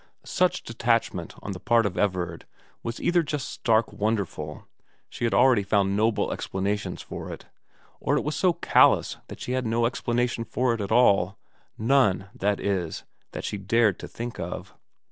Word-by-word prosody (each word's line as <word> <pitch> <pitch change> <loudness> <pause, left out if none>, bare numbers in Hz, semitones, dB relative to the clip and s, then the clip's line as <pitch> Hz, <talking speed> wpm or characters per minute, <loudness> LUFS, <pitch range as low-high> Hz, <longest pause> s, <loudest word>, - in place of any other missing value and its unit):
Such 180 0 +1
detachment 115 0 -1
on 100 - -4
the 90 - -6
part 115 +2 +3
of 95 -3 -1
Everard 90 -5 -1 0.3
was 115 0 -5
either 175 0 +3
just 150 -3 -3
stark 115 -1 +1
wonderful 100 -8 -2 0.4
she - - -3
had 115 - 0
already 125 -3 +5
found 100 0 +1
noble 110 +1 +1
explanations 100 +2 -3
for - - -7
it - - -9 0.5
or - - +1
it - - 0
was 150 +1 -2
so 185 - +3
callous - - +4
that - - -9
she - - -5
had 130 -2 0
no 115 +1 +2
explanation 120 0 0
for 120 +2 0
it 115 - -3
at 100 - -4
all; 100 -5 +4 0.4
none, 110 -5 +2
that 100 +1 0
is, 95 -5 -2 0.3
that - - -5
she 105 - -3
dared 105 0 +2
think 120 0 -6
of. - - -6
110 Hz, 165 wpm, -26 LUFS, 100-120 Hz, 0.5 s, already